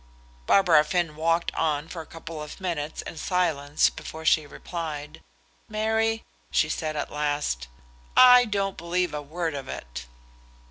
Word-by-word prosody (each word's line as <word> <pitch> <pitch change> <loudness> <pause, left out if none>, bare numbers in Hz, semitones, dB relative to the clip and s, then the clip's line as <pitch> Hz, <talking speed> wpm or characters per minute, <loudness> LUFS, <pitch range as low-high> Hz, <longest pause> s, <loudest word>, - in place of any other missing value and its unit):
Barbara 170 -6 +6
Finn 165 0 -1
walked 165 +2 +1
on 150 -1 0
for 165 0 -6
a 160 - -12
couple 165 -1 -8
of 150 +4 -8
minutes 160 -5 -3
in - - -8
silence 155 -5 +1
before 160 0 -8
she 155 -1 +4
replied. 155 -1 -6 0.5
"Mary," 220 +1 0 0.3
she 155 - +2
said 155 0 -2
at 145 - -3
last, 145 - -1 0.5
"I 250 -1 +9
don't 200 -3 -1
believe 175 +1 -1
a 150 - -3
word 160 +2 -3
of 135 -2 -6
it." - - -7
160 Hz, 145 wpm, -26 LUFS, 150-180 Hz, 0.5 s, I